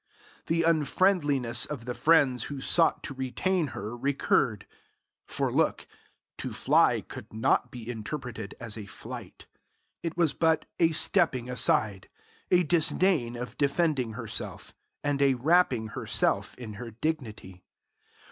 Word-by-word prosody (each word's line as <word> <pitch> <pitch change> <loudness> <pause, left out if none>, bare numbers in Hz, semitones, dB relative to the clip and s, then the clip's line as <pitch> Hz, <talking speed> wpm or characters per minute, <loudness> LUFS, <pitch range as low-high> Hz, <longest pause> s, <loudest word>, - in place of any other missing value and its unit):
The 165 +1 +1
unfriendliness 150 -6 +2
of 135 -6 -6
the 125 - -3
friends 135 -6 +3
who 140 -2 -6
sought 165 +4 +2
to - - -5
retain 150 +7 -1
her 110 -2 -6
recurred. 125 -4 +1 0.6
For - - -1
look - - +1 0.5
to - - -4
fly - - +3
could - - -10
not 110 +1 +1
be 120 -3 -9
interpreted 115 -2 -6
as 115 -2 -5
a 105 - -8
flight. - - -9 0.6
It 165 0 -4
was 165 -4 +2
but 160 -1 +2
a 165 -1 +4
stepping 155 - +2
aside, 105 -4 +1 0.4
a 180 0 +4
disdain 160 -5 +2
of 125 +1 -7
defending 140 -5 +1
herself, 115 -1 -5 0.3
and 145 -1 0
a 135 -2 +4
wrapping 130 -5 +2
herself - - 0
in 115 -4 -8
her 120 - -6
dignity. 110 - -4
135 Hz, 130 wpm, -28 LUFS, 115-160 Hz, 0.6 s, a